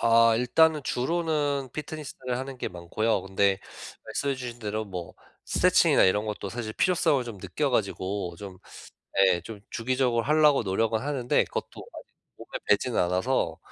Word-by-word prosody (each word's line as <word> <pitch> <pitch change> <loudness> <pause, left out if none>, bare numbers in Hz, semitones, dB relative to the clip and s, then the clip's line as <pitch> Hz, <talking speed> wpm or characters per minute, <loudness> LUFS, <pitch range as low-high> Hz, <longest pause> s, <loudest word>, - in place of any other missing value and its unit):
아. 115 0 +5
일단은 150 +5 +3
주로는 145 -1 -1
피트니스를 145 -5 -5
하는 135 0 -6
게 - - -3
많고요. 90 +4 -1
근데 95 0 +1 0.5
말씀해 140 -1 -2
주신 125 -2 -7
대로 110 -1 -3
뭐 90 -4 -7 0.3
스트레칭이나 - - +4
이런 105 +3 +2
것도 105 -1 -4
사실 110 0 -5
필요성을 160 - +2
좀 115 -5 -8
느껴 - - -2
가지고 95 -2 -2
좀 95 -3 -9 0.7
예. 90 -2 +2
좀 105 +3 -9
주기적으로 125 0 0
하려고 150 -2 +4
노력은 110 +3 0
하는데 135 -3 +1
그것도 - - -6
아직 - - -11 0.3
몸에 - - -12 0.2
배지는 110 +3 +2
않아서 90 -1 0
115 Hz, 350 characters per minute, -27 LUFS, 100-135 Hz, 0.7 s, 아